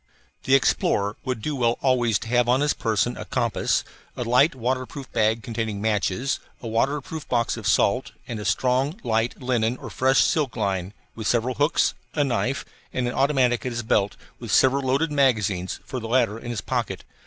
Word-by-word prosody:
The 130 - +5
explorer 105 -5 +2
would 125 -5 -3
do 150 - -2
well 120 -2 +1
always 120 -5 +3
to - - -8
have 120 0 +2
on 130 +3 +3
his 150 +1 +2
person 115 +2 0
a - - -5
compass, 120 -4 0 0.3
a - - -1
light 125 +6 +4
waterproof 130 +2 -3
bag 110 +1 +1
containing 110 -2 -3
matches, 110 +4 0 0.2
a 120 - -7
waterproof 140 +7 -2
box 120 -2 +1
of 110 -4 -5
salt, 110 +4 +2 0.2
and 115 -3 -4
a 105 - -6
strong, 130 - +1
light, 115 +1 0
linen 125 -2 0
or - - -9
silk 135 +1 +2
fish - - -9
line 95 0 -2 0.2
with 110 -2 -5
several 120 +2 +1
hooks, 145 +6 +2 0.2
a 150 - +3
knife, 130 0 -1 0.3
and 125 -1 -1
an 120 - -2
automatic 130 -3 +2
at 125 - -2
his 120 0 -3
belt, 105 -2 +1 0.2
with - - -6
several 135 +1 +4
loaded 140 +5 +1
magazines 110 -10 +1
for 130 - -4
the 115 - -6
latter 115 -2 +1
in 120 - -8
his 115 -4 -3
pocket. - - -3
120 Hz, 190 wpm, -24 LUFS, 110-130 Hz, 0.3 s, The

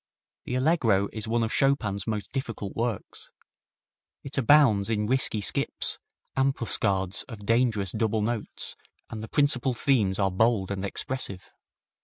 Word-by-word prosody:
The 125 - -3
Allegro 125 - +2
is 110 0 -5
one 115 +1 +1
of 110 - -2
Chopin's 115 -8 +1
most 105 -2 -3
difficult 115 -6 -4
works. 115 -2 -3 0.9
It 140 - -6
abounds 130 -6 +4
in 105 -2 0
risky 120 -2 0
skips, - - 0 0.4
ambuscades 100 -8 +1
of 105 -4 -9
dangerous 115 -4 +1
double 110 -1 0
notes, 115 -1 -3 0.4
and 110 -2 -5
the 110 - -6
principal 135 -3 +2
themes 115 -7 +2
are 95 -2 +1
bold 100 0 +1
and 100 -1 -3
expressive. 100 -1 -2
110 Hz, 135 wpm, -27 LUFS, 100-130 Hz, 0.9 s, abounds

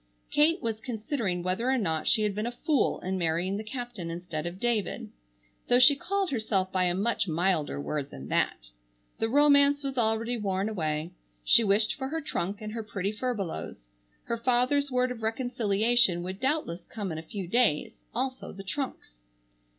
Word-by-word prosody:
Kate 320 +4 +3
was 225 -2 -2
considering 220 - -3
whether 185 +8 0
or 265 - +3
not 160 -8 -1
she 215 - +4
had 210 -1 0
been 210 +3 -2
a - - -2
fool 295 +3 0
in 185 +1 -2
marrying 175 +3 0
the 215 - -5
captain 235 -6 -5
instead 170 -2 -4
of 175 +2 -7
David, 235 -3 -1 0.6
though 245 - +5
she 260 +3 +8
called 390 +4 -1
herself 210 -6 0
by 185 -1 +2
a 175 0 +1
much 210 +1 0
milder 165 - 0
word 140 - -3
than 65 - -9
that. - - 0 0.5
The 225 - 0
romance 285 +1 +5
was 270 -2 -2
already 230 +1 +1
worn 195 -2 -1
away. 155 -4 -2 0.3
She 230 - +6
wished 210 +1 +3
for 265 -1 -4
her 320 +4 -3
trunk 205 - -3
and 215 0 -6
her 230 - -3
pretty 200 -2 -3
furbelows. 210 - -4 0.4
Her 235 - -3
father's 255 +4 +2
word 250 -1 +1
of 235 -2 -7
reconciliation 225 -4 +2
would 185 +2 -6
doubtless 260 - -1
come 205 -5 -4
in 160 - -4
a - - -6
few 185 +3 -6
days, 230 -6 +2
also 260 +2 -3
the 195 - -9
trunks. 265 - -4
215 Hz, 180 wpm, -28 LUFS, 185-250 Hz, 0.6 s, she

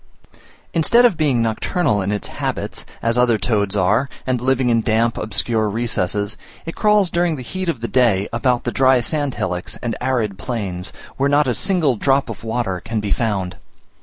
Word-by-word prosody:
Instead 235 +9 +5
of 230 -7 +4
being 140 -7 +2
nocturnal 115 - 0
in 95 +2 -1
its 105 - -3
habits, - - -4 0.2
as 115 +1 +2
other 120 -2 +4
toads 105 -3 0
are, 105 +8 +2 0.2
and 125 -2 -1
living 130 0 +1
in 115 -1 +3
damp 115 +1 +1
obscure 110 0 0
recesses, 105 -2 -1 0.3
it 165 - -5
crawls 210 -4 +3
during 170 -2 +1
the 130 - -7
heat 185 +9 -4
of 130 -8 -2
the 115 - -2
day 110 -7 +2
about 120 +1 +1
the 120 - -2
dry 130 0 +4
sand 145 +1 -1
hillocks 90 -1 -3
and 120 -2 -2
arid 115 -6 -1
plains, 100 -8 -3 0.3
where 140 +1 +2
not 145 0 +3
a 125 - +2
single 165 - +1
drop 135 +4 +1
of - - -10
water 110 -5 -2
can 115 -1 -2
be 105 -1 -3
found. 100 -6 -1
120 Hz, 185 wpm, -20 LUFS, 105-135 Hz, 0.3 s, Instead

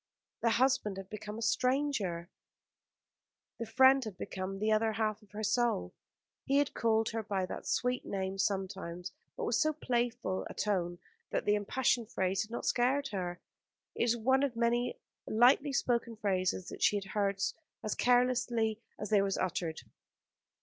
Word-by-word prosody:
The 230 - +3
husband 235 -4 +2
had 195 0 -8
become 215 0 -6
a 230 - -4
stranger, 250 -11 0 1.3
the 230 - -4
friend 260 +4 +6
had 215 -5 -7
become 190 0 -4
the 215 +2 0
other 220 +1 +2
half 215 0 -1
of 210 - -21
her 210 +2 -6
soul. 230 - +1 0.5
He 275 - +2
had 285 -1 +2
called 225 -1 +2
her 225 0 -2
by 200 -3 -1
that - - -7
sweet 250 0 0
name 195 0 -3
sometimes, 190 -3 -2 0.3
but - - -3
with 230 - +1
so 310 -1 +2
playful 240 -8 -1
a - - -9
tone 175 -4 -1 0.3
that - - -1
the 205 - +4
impassioned 230 +2 +1
phrase 190 0 0
had 215 - -5
not 235 - -5
scared 270 +3 +2
her. 180 -3 -4 0.5
It - - +1
was 240 0 +2
one 260 +4 +3
of 275 -4 0
many 240 - +1 0.3
lightly 255 +6 +4
spoken 235 -3 0
phrases 185 -3 -1
that - - -9
she - - +4
had 200 -1 -2
heard 200 -2 0 0.4
as 215 - -1
carelessly 245 -3 +2 0.2
as 210 - -6
they 205 -2 +5
were 195 - +1
uttered. 170 -3 -2
220 Hz, 165 wpm, -32 LUFS, 195-245 Hz, 1.3 s, friend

